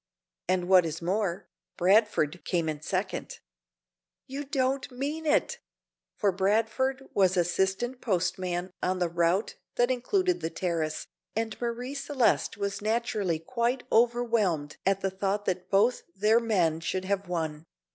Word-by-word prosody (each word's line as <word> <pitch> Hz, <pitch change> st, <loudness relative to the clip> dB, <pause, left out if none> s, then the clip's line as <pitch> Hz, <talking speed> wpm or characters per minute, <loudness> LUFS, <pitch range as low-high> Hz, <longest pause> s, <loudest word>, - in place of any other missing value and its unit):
"And 180 Hz, -1 st, +1 dB
what 185 Hz, -1 st, +7 dB
is 165 Hz, -1 st, -3 dB
more, 185 Hz, +1 st, -1 dB, 0.3 s
Bradford 185 Hz, -4 st, +3 dB
came 170 Hz, -3 st, 0 dB
in 150 Hz, -1 st, -3 dB
second." -, -, -3 dB, 0.9 s
"You 280 Hz, +2 st, -5 dB
don't 270 Hz, -1 st, 0 dB
mean 290 Hz, +5 st, -4 dB
it!" 475 Hz, +10 st, +2 dB, 0.6 s
for 200 Hz, -, +2 dB
Bradford 225 Hz, +8 st, +1 dB
was 190 Hz, -2 st, +3 dB
assistant 190 Hz, +8 st, 0 dB
postman 180 Hz, -2 st, -1 dB
on 185 Hz, 0 st, 0 dB
the 175 Hz, -2 st, 0 dB
route 170 Hz, +4 st, +1 dB, 0.2 s
that 245 Hz, +1 st, +3 dB
included 360 Hz, +9 st, +1 dB
the 160 Hz, -, -1 dB
Terrace, 165 Hz, -3 st, -2 dB, 0.3 s
and 225 Hz, -1 st, -1 dB
Marie 240 Hz, +3 st, -3 dB
Celeste 275 Hz, -7 st, +1 dB
was 200 Hz, 0 st, -3 dB
naturally 215 Hz, -5 st, 0 dB
quite 235 Hz, +8 st, -1 dB
overwhelmed 225 Hz, -10 st, +2 dB
at 195 Hz, 0 st, +2 dB
the 195 Hz, -, 0 dB
thought 200 Hz, +2 st, -1 dB
that 185 Hz, -1 st, -2 dB
both 215 Hz, +5 st, +3 dB
their 215 Hz, +4 st, +4 dB
men 180 Hz, -9 st, +1 dB
should 185 Hz, +3 st, -2 dB
have 200 Hz, 0 st, -1 dB
won. 160 Hz, -2 st, -3 dB
200 Hz, 135 wpm, -28 LUFS, 175-240 Hz, 0.9 s, what